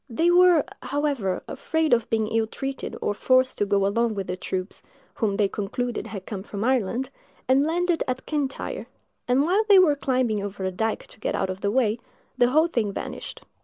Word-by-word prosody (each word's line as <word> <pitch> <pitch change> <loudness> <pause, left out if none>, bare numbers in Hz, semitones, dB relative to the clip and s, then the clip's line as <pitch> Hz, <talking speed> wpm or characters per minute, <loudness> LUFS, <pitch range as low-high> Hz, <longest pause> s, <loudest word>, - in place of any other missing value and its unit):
They 330 +9 +2
were, 355 -3 +6 0.2
however, 275 -10 -1
afraid 320 -4 0
of 235 -1 +2
being 220 -1 +1
ill 225 -1 +1
treated, 270 +3 -5
or 205 - +1
forced 255 +4 +2
to 205 - +1
go 200 -1 +2
along 225 +2 +1
with 195 -1 -3
the 180 - -3
troops, 185 +1 -4 0.3
whom 205 -4 -1
they 205 -2 +3
concluded 225 +5 -3
had 195 -3 -7
come 200 -3 -5
from 200 0 -5
Ireland, 255 +1 0 0.4
and 265 +2 +4
landed 345 +2 +1
at 255 0 -3
Kyntyre; 295 - -3 0.4
and 250 +3 +3
while 385 +6 +3
they 400 - +8
were 345 -6 +6
climbing 255 -6 0
over 200 -1 -5
a 190 - -1
dike 220 +4 -2
to - - -16
get - - -2
out 190 - -1
of 185 +1 -8
their 200 - +1
way, 230 -1 +1 0.4
the 245 - +4
whole 310 +5 +4
thing 230 -11 -1
vanished. - - -7
240 Hz, 200 wpm, -25 LUFS, 205-285 Hz, 0.4 s, they